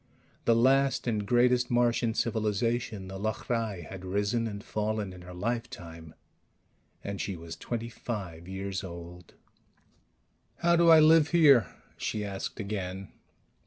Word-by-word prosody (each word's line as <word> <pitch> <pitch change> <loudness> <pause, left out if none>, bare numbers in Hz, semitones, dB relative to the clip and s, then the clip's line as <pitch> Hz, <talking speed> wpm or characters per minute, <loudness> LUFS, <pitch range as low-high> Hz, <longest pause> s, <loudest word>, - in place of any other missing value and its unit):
The 115 - +5
last 135 +3 +3
and 105 -4 -1
greatest 125 +1 +3
Martian 120 -1 +2
civilization, 110 -2 -1
the 95 0 -7
L'hrai, 110 -2 -2
had 95 -1 -9
risen 100 +5 0
and 100 -1 -6
fallen 105 -4 -2
in 90 - -11
her 90 0 -10
lifetime. 90 -7 -5 0.9
And 100 -1 -4
she 100 - -3
was 85 -1 -8
twenty 115 -1 -4
five 95 -8 -6
years 95 0 -4
old. 85 -1 -10 1.2
"How 170 0 +3
do 170 0 +5
I 160 -1 +9
live 155 0 +6
here?" 140 - +6 0.3
she 105 -1 -3
asked 100 +2 -5
again. 95 -2 -4
105 Hz, 130 wpm, -29 LUFS, 95-120 Hz, 1.2 s, I